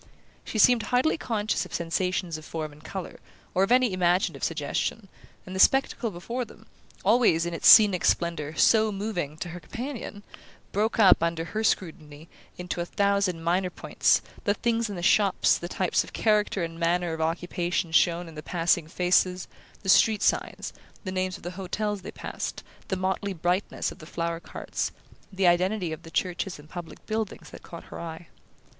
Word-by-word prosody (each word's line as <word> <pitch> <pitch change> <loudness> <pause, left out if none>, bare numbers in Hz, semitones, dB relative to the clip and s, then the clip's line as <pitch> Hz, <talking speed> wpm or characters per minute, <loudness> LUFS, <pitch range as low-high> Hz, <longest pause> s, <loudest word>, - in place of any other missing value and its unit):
She - - -5
seemed 240 +2 +6
hardly 255 +5 +3
conscious 215 -7 -1
of - - -7
sensations 175 0 -1
of - - -14
form 155 -1 -5
and 150 +1 -17
colour, 190 -3 -7 0.3
or 185 - +2
of 195 - +2
any 250 -4 +4
imaginative 180 -4 +1
suggestion, 165 +6 -2 0.4
and 185 - -8
the - - -3
spectacle 270 0 +3
before 225 +7 -4
them 220 -1 -14 0.4
always, 205 -7 +4
in 170 - -3
its 165 - +1
scenic 205 -5 +8
splendour, 160 -3 0
so 220 +4 +4
moving 195 -7 -3
to 175 - -5
her 175 +2 -7
companion 230 - -7 0.5
broke 215 +4 0
up, 200 -7 +6
under 165 0 -1
her 220 +5 -3
scrutiny, 155 -6 -2 0.3
into 180 -1 -4
a - - -2
thousand 200 -4 +1
minor 180 +2 +1
points: - - +1 0.2
the 205 -2 +1
things 230 -1 0
in 200 - -5
the 175 - -6
shops, 200 0 +3
the 175 - -6
types 185 -1 +1
of - - -13
character 210 -4 +1
and 165 0 -6
manner 170 0 +1
of 160 - -4
occupation 175 +1 -1
shown 170 +1 +3
in 165 - -11
the 150 - -7
passing 170 -1 +1
faces, 180 +1 +1 0.4
the - - -8
street 215 +2 +5
signs, - - 0 0.3
the 185 - -4
names 185 -1 -2
of - - -19
the 175 - -4
hotels 205 +2 -2
they - - -8
passed, - - -6 0.2
the 190 - -1
motley 190 +1 -1
brightness 180 +3 -1
of - - -13
the 155 - -11
flower 170 0 -3
carts, - - -4 0.4
the 190 -1 0
identity 180 +1 +2
of 160 - -6
the 165 - -12
churches 180 +2 -2
and 150 +1 -15
public 175 -2 -9
buildings 220 -1 -4
that - - -11
caught 170 - -10
her - - -7
eye. 165 0 -8
180 Hz, 180 wpm, -26 LUFS, 170-205 Hz, 0.5 s, scenic